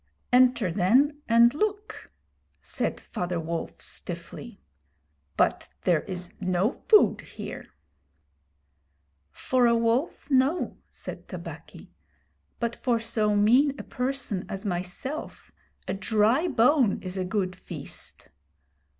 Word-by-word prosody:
'Enter, 250 -6 +4
then, 260 - +3
and 235 +1 +6
look,' 420 +5 -3 0.5
said - - -3
Father 175 -1 -3
Wolf, 165 +1 -4
stiffly; - - -6 0.8
'but - - +1
there 170 -4 +3
is 180 -2 -6
no 185 +4 +1
food 425 +6 +4
here.' - - -8 1.6
'For 250 - +1
a 235 - +4
wolf, 235 +6 0
no,' 270 +6 +2
said - - -8
Tabaqui; - - -9 0.7
'but 235 -1 -2
for 240 -3 +1
so 215 -2 +1
mean 250 +8 +4
a - - -6
person 250 -7 -3
as 195 +2 -6
myself 185 - -5 0.4
a - - -1
dry 220 - +2
bone 255 - +3
is 185 0 -5
a 190 - -1
good 185 -1 -1
feast. 180 - -7
230 Hz, 110 wpm, -27 LUFS, 185-265 Hz, 1.6 s, and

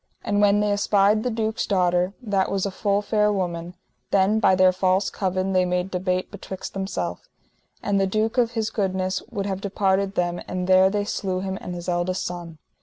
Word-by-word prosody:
And 205 0 +1
when 205 0 +4
they 210 0 +1
espied 205 +1 +3
the 250 - -1
duke's 220 -1 -2
daughter, 180 -1 +1
that 200 -4 0
was 195 -1 -1
a 200 - -2
full 200 +2 0
fair 210 0 +2
woman, 175 -3 -3 0.3
then 200 +3 +3
by 190 -3 +4
their 185 0 +5
false 185 +1 +1
covin 190 0 -1
they 185 0 +4
made 180 +1 -1
debate 185 0 -1
betwixt 190 -2 -7
themself, 90 - -4 0.5
and 200 -1 +1
the 195 - +2
duke 220 +5 0
of 235 -1 +2
his 220 -2 -1
goodness 190 -2 -1
would 200 - -3
have 195 -1 -3
departed 195 0 0
them, 175 0 -1
and 185 0 -3
there 185 +1 +5
they 205 0 -1
slew 185 -3 -2
him 190 0 -3
and 180 - -6
his 175 0 -7
eldest 180 +1 -1
son. 175 -2 -6
190 Hz, 195 wpm, -24 LUFS, 185-205 Hz, 0.5 s, their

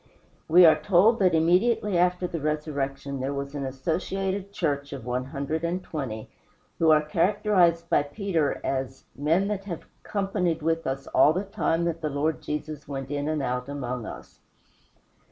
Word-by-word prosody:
We 175 +2 +8
are 160 - +6
told 205 +5 +4
that 185 -4 +4
immediately 185 +5 +2
after 180 +1 +2
the 170 -3 -4
resurrection 140 -2 -2
there 135 +2 -2
was 140 0 -4
an 145 -1 -4
associated 190 +8 -2
church 140 -7 -2
of 130 -4 -7
one 125 +1 -2
hundred 140 +4 -3
and 175 +2 -1
twenty, 125 -8 -5 0.5
who 165 - +4
are 155 -1 +5
characterized 170 +1 +2
by - - +3
Peter 160 0 -1
as 135 0 -3
"men 160 +8 +1
that 200 -2 -3
have 175 -5 -6 0.2
companied 185 -5 -1
with 165 +1 0
us 135 +1 -3
all 150 - +4
the 185 +4 -1
time 170 -4 0
that 165 -1 -2
the 155 - -1
Lord 150 +2 -1
Jesus 150 0 -5
went 135 -1 -5
in 145 0 -2
and 155 -2 -1
out 125 +1 -2
among 125 -5 -4
us." - - -10
155 Hz, 170 wpm, -26 LUFS, 140-180 Hz, 0.5 s, We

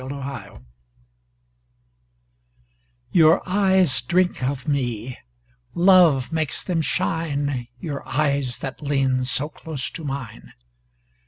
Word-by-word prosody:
The - - -8
Mystery 135 -7 -7 2.5
Your 160 0 +5
eyes 190 - +3
drink 175 +8 +1
of 130 0 -2
me, 125 -4 -2 0.6
Love 170 -8 +5
makes 155 -4 -2
them 175 -3 0
shine, 145 -5 -1
Your 145 -2 -5
eyes 140 -2 0
that 135 +2 -7
lean 135 -3 +1
So 140 +2 -1
close 155 -3 -5
to 165 - -8
mine. 135 - -6
140 Hz, 100 wpm, -23 LUFS, 130-165 Hz, 2.5 s, Your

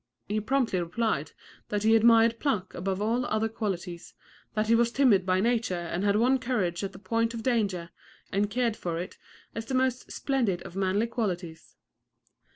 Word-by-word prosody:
He 210 +1 0
promptly 240 -4 +1
replied 175 -3 -1 0.4
that 205 0 -1
he 220 +1 +5
admired 230 0 +5
pluck 210 -11 -1
above 190 +2 -2
all 235 +4 +1
other 220 +1 +1
qualities, 185 -6 -5 0.4
that 215 0 +1
he 225 - +3
was 235 0 +3
timid 230 -9 +3
by 185 0 +3
nature 230 -4 +1
and 175 +1 -3
had 200 0 +3
won 250 +5 +3
courage 210 -9 -1
at 195 -1 -4
the - - -10
point 230 +4 -1
of 225 - -5
danger, 200 -9 0 0.4
and 200 +1 +1
cared 235 0 0
for 170 -5 -3
it 180 +3 -6 0.3
as 225 0 -5
the 265 - -2
most 255 -1 0
splendid 240 -10 -1
of 175 - -10
manly 195 +3 +1
qualities. 185 -8 -4
215 Hz, 175 wpm, -28 LUFS, 185-235 Hz, 0.4 s, he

